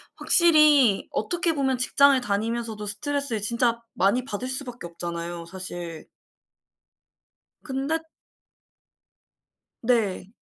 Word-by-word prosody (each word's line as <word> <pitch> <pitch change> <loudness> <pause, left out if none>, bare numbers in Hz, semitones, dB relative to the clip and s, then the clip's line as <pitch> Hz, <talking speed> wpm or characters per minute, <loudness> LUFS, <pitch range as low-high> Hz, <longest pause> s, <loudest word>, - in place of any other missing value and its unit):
확실히 305 - +5
어떻게 335 +8 0
보면 265 -3 0
직장을 275 +2 +4
다니면서도 220 -1 -3
스트레스를 240 +2 -2
진짜 235 +2 0
많이 220 +7 +1
받을 255 +1 -4
수밖에 255 -6 -5
없잖아요 170 0 -6
사실. 175 -2 -8 1.5
근데 280 +3 -2 1.8
네. 225 -6 0
235 Hz, 225 characters per minute, -24 LUFS, 200-275 Hz, 1.8 s, 확실히